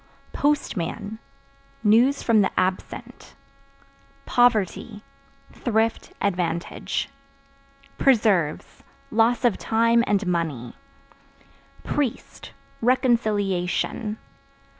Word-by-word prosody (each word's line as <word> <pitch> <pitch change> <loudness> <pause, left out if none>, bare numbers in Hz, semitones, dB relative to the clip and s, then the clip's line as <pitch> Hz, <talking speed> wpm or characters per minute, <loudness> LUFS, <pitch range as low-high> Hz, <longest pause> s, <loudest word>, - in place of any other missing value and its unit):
Postman 220 - -1 0.6
News 235 +6 +4
from 225 -3 +4
the 195 - +2
absent. 185 0 -4 0.9
Poverty 220 -3 +1 0.5
Thrift, 225 -1 -1
advantage. 175 -3 -2 0.9
Preserves 210 - +2 0.3
Loss 230 +3 +2
of 235 -5 +2
time 230 +1 +3
and 205 -1 +1
money. 160 -9 -2 1.1
Priest 280 -6 -3 0.3
Reconciliation. 215 -5 0
215 Hz, 65 wpm, -24 LUFS, 185-235 Hz, 1.1 s, News